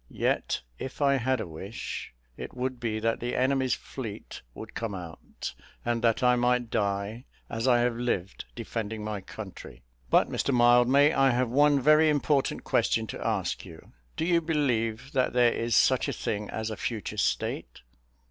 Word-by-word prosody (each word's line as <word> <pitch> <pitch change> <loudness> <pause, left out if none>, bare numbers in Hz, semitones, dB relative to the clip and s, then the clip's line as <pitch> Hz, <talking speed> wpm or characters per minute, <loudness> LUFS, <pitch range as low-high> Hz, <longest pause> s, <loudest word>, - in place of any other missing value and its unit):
Yet, - - -1 0.2
if 130 - -6
I 140 -1 +3
had 130 0 0
a - - -3
wish, 95 +7 -6 0.2
it - - -8
would 130 0 -3
be 110 -2 -2
that 115 0 0
the 120 +1 -3
enemy's 130 0 +2
fleet 115 -7 -8
would - - -9
come 115 -4 -3
out, 85 -4 -7 0.3
and 120 -1 0
that 115 +2 +2
I 125 0 +5
might 125 -1 +1
die, 100 +3 -1 0.3
as 115 +2 -1
I 120 -2 +5
have 120 -1 +1
lived, 100 - -2
defending 110 -1 -4
my 105 -2 -4
country. 95 - -10 0.3
But, - - +4
Mr - - -1
Mildmay, 125 +4 +5
I 135 0 +4
have 125 -1 +1
one 145 +3 +4
very 155 +3 +5
important 145 -2 +1
question 110 - +1
to - - -6
ask 105 -6 -1
you 80 -4 -13 0.3
do 160 - 0
you 170 -1 +3
believe 130 -6 -1
that 130 -2 +1
there 120 -1 +4
is 115 -1 0
such - - +4
a - - -1
thing 105 0 -3
as 110 0 -3
a 110 - -5
future 110 -3 -4
state?" - - -2
120 Hz, 175 wpm, -28 LUFS, 110-130 Hz, 0.3 s, I